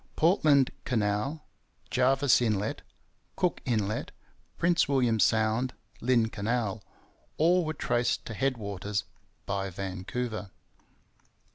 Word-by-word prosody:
Portland 155 -6 +4
Canal, 110 +6 -1 0.5
Jervis 135 0 +4
Inlet, 105 -3 0 0.5
Cook 180 -2 0
Inlet, 110 -5 -1 0.5
Prince 170 0 +3
William 125 -5 +2
Sound, 110 +4 +2 0.3
Lynn 120 -2 +3
Canal 110 -1 -2 0.6
all 175 +3 +4
were 155 -1 -3
traced 120 -3 0
to 115 - -6
head 135 +3 0
waters 100 -1 -3 0.4
by 95 -1 -2
Vancouver. 95 +4 -4
120 Hz, 100 wpm, -29 LUFS, 105-135 Hz, 0.6 s, Portland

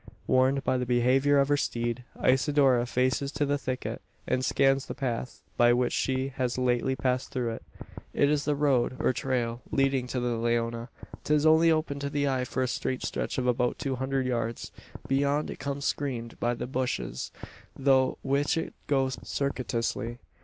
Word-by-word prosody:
Warned 130 +1 +3
by 130 - +1
the 125 - -1
behaviour 130 +4 +3
of 140 0 +3
her 145 - +3
steed, 120 -2 -2 0.2
Isidora 130 -2 +3
faces 130 +3 0
to 145 - 0
the 145 0 0
thicket, 130 -2 -4 0.2
and 130 - 0
scans 135 0 +2
the - - -5
path 125 -2 -4
by 120 0 +6
which 125 0 +1
she 130 0 0
has 125 -1 -1
lately 125 +1 +1
passed 130 -1 -1
through 120 -3 -2
it. 115 - -7 0.5
It 145 - +3
is 145 0 +1
the 150 - +1
road, 135 -4 +2
or - - +2
trail, 120 -2 -1
leading 135 -2 +1
to 125 - -2
the 120 -1 -1
Leona. 115 +1 -1 0.3
'Tis 150 0 +2
only 160 +1 +6
open 155 -3 0
to 140 0 -3
the 145 0 0
eye 130 -2 0
for 130 +1 -1
a - - 0
straight 130 +1 -2
stretch - - -3
of 130 - 0
about 125 0 +1
two 135 -2 -2
hundred 130 0 -1
yards. 115 -2 -2 0.4
Beyond, 140 +2 +1
it - - -8
becomes 140 0 -3
screened 120 -5 -3
by 120 +1 0
the - - -4
bushes, 125 - -3 0.5
through 130 -1 +3
which 140 +3 +1
it 165 - -3
goes 135 -2 +1
circuitously. 120 -3 -2
130 Hz, 180 wpm, -28 LUFS, 120-140 Hz, 0.5 s, by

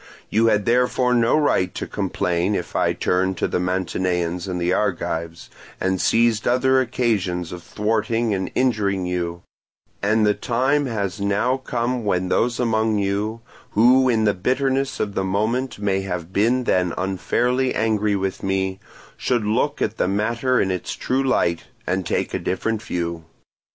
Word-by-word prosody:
You 115 +2 +3
had 105 -2 +2
therefore 125 +1 +2
no 120 +4 +3
right 95 - +1
to - - -3
complain 90 +3 -1
if 90 - -4
I - - +2
turned 95 0 0
to - - 0
the - - -1
Mantineans 90 -1 -1
and 90 -2 -3
Argives, 85 -4 -2 0.3
and 95 -1 0
seized 115 -1 +2
other 130 +2 +3
occasions 105 -9 -1
of 90 - -7
thwarting 110 +4 0
and 95 -1 -2
injuring 100 -7 +1
you; 85 -1 -3 0.6
and 110 +2 +2
the 105 - +4
time 130 +6 0
has 100 -5 -3
now 105 +6 +1
come 125 -1 -2
when 90 -3 0
those 120 +4 +1
among 110 -2 +1
you, 100 +3 -1 0.3
who 125 +4 +5
in 110 -2 +2
the 105 -1 +3
bitterness 135 +6 0
of 100 -1 -2
the 95 - -1
moment 110 +7 -1
may 100 -2 0
have 90 -2 -5
been 120 +5 +2
then 90 -6 +1
unfairly 120 +7 0
angry 105 -2 +1
with 95 -1 -2
me, 95 0 -1 0.4
should 120 -4 0
look 125 +7 0
at 110 - -2
the - - +1
matter 115 +6 +1
in 95 - +1
its 90 -1 -3
true 130 +1 -1
light, 85 -10 +1 0.2
and 90 -1 -1
take - - -1
a - - -1
different 110 +3 -2
view. 85 -3 -3
105 Hz, 160 wpm, -22 LUFS, 95-120 Hz, 0.6 s, who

